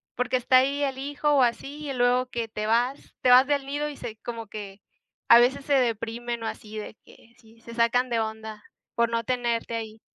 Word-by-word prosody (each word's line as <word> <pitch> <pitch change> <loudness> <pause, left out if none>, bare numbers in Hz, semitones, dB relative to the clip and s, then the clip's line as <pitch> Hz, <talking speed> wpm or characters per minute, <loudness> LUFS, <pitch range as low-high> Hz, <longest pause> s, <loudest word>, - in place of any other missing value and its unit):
porque 250 +1 0
está 255 +1 +4
ahí 280 +2 +2
el 270 -1 -2
hijo 290 +2 -1
o 275 - +4
así, 285 +5 -2
y 275 - -2
luego 250 +1 +2
que 235 -2 -3
te 215 0 -4
vas 245 +4 0
te 250 - +3
vas 255 +2 +7
del 285 -2 0
nido 290 +2 -3
y 290 - -9
se 220 -1 -7
como 230 -2 -6
que 200 -2 -9 0.5
a 235 - +9
veces 265 +3 +2
se 285 - 0
deprimen 235 -1 -1
o - - -2
así 220 0 -7
de 215 0 -7
que 230 - -20
sí 225 -1 -21
se 230 0 -11
sacan 245 +2 +2
de 230 -1 0
onda 220 -1 -5 0.3
por 235 0 +2
no 230 0 -1
tenerte 235 -1 -1
ahí. 220 -1 -6
240 Hz, 220 wpm, -26 LUFS, 225-265 Hz, 0.5 s, a